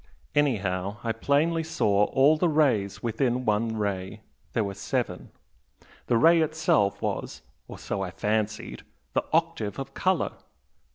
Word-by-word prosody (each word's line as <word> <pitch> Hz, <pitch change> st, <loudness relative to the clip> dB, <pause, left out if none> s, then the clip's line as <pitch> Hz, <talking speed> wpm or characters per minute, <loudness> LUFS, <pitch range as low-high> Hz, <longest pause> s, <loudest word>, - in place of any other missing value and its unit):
Anyhow 100 Hz, -8 st, 0 dB
I 115 Hz, -, 0 dB
plainly 145 Hz, +8 st, +1 dB
saw 105 Hz, -11 st, +2 dB
all 140 Hz, +6 st, +4 dB
the 170 Hz, +2 st, +1 dB
rays 130 Hz, -11 st, +1 dB
within 120 Hz, +2 st, 0 dB
one 110 Hz, +1 st, 0 dB
ray 100 Hz, 0 st, -3 dB, 0.3 s
there 110 Hz, -, +1 dB
were 100 Hz, -1 st, -4 dB
seven. 95 Hz, -, -3 dB, 0.8 s
The 120 Hz, -, +3 dB
ray 165 Hz, +5 st, +6 dB
itself 155 Hz, -10 st, +1 dB
was -, -, -3 dB, 0.2 s
or -, -, -9 dB
so 100 Hz, -, -4 dB
I 95 Hz, -, -2 dB
fancied 110 Hz, +3 st, -2 dB, 0.3 s
the -, -, +1 dB
octave 160 Hz, -, 0 dB
of 135 Hz, 0 st, -6 dB
colour. 185 Hz, +1 st, +1 dB
115 Hz, 135 wpm, -26 LUFS, 105-155 Hz, 0.8 s, ray